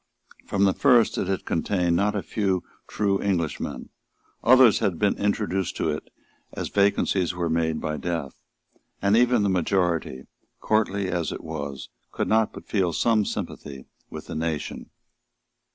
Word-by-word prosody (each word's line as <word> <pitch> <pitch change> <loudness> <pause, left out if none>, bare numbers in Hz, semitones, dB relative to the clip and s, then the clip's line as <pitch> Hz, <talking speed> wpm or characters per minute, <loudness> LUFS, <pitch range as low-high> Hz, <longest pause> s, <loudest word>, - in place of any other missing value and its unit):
From 100 - +1
the 95 -1 +4
first 120 -6 +4
it - - -1
had 95 -1 -2
contained 85 0 0
not 105 +4 +1
a 100 - -2
few 95 -4 -1 0.2
true 100 -2 0
Englishmen; 85 -6 -2 0.5
others 125 -2 +6
had 90 -4 0
been 105 +2 +2
introduced 100 -3 -1
into - - +1
it - - -10 0.4
as - - -4
vacancies 100 -3 +1
were 85 -2 -1
made 80 -1 0
by 75 0 -3
death; 80 -3 -4 0.6
and 100 +2 +3
even 120 -2 +4
the - - +2
majority, 90 -7 0 0.3
courtly 100 -3 0
as 85 -2 -1
it - - -7
was, 70 -4 -6 0.2
could - - -2
not 110 0 +2
but - - -11
feel 95 -5 0
some 110 +3 +2
sympathy 70 -8 -6 0.2
with - - -8
the - - -7
nation. 80 -1 -4
95 Hz, 150 wpm, -25 LUFS, 80-105 Hz, 0.6 s, others